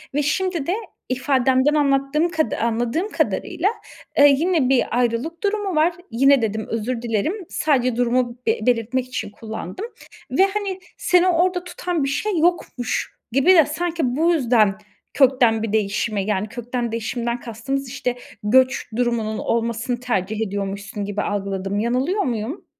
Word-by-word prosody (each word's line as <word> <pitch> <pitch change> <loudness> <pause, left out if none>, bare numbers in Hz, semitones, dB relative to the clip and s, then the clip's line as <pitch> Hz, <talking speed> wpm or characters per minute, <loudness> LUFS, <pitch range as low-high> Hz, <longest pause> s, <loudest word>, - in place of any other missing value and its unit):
ve 295 - +2
şimdi 340 0 -1
de 360 - +1 0.4
ifadenden 260 +2 +2
anlattığım 285 +3 +2
kada 320 -2 -1
anladığım 235 - -1
kadarıyla, 400 - 0 0.5
eee, 285 0 +8
yine 320 -5 +2
bir 245 -2 +2
ayrılık 250 - -1
durumu 405 -3 -1
var. 325 +3 +3 0.2
"Yine" 270 +2 +4
dedim, 220 0 -2
özür 230 +2 -2
dilerim. 230 - 0 0.2
Sadece 255 -6 +1
durumu 245 0 +1
be 450 +1 +2
belirtmek 245 +1 +1
için 250 - -4
kullandım 220 - -6 0.5
ve, 380 - +4
hani, 395 -1 -3 0.2
seni 360 0 +3
orada 360 +1 +2
tutan 355 -3 -3
bir 275 - 0
şey 370 +4 -1
yokmuş 330 -8 0 0.2
gibi 275 +9 +5
de 320 -5 +7
sanki 315 -4 -2
bu 330 +3 +3
yüzden 230 -8 +3 0.4
kökten 250 -5 +4
bir 220 -1 -3
değişime, 210 -1 0
yani, 210 0 -1
kökten 240 0 -4
değişimden 235 +1 -2
kastımız, 260 +4 -4
işte, 250 -2 -2 0.3
göç 260 +5 +3
durumunun 230 -3 0
olmasını 235 +1 -1
tercih 220 -2 -1
ediyormuşsun 200 +1 -4
gibi 205 0 -2
algıladım. 195 0 -2
Yanılıyor 260 - 0
muyum? 240 - -3
250 Hz, 140 wpm, -22 LUFS, 225-315 Hz, 0.5 s, eee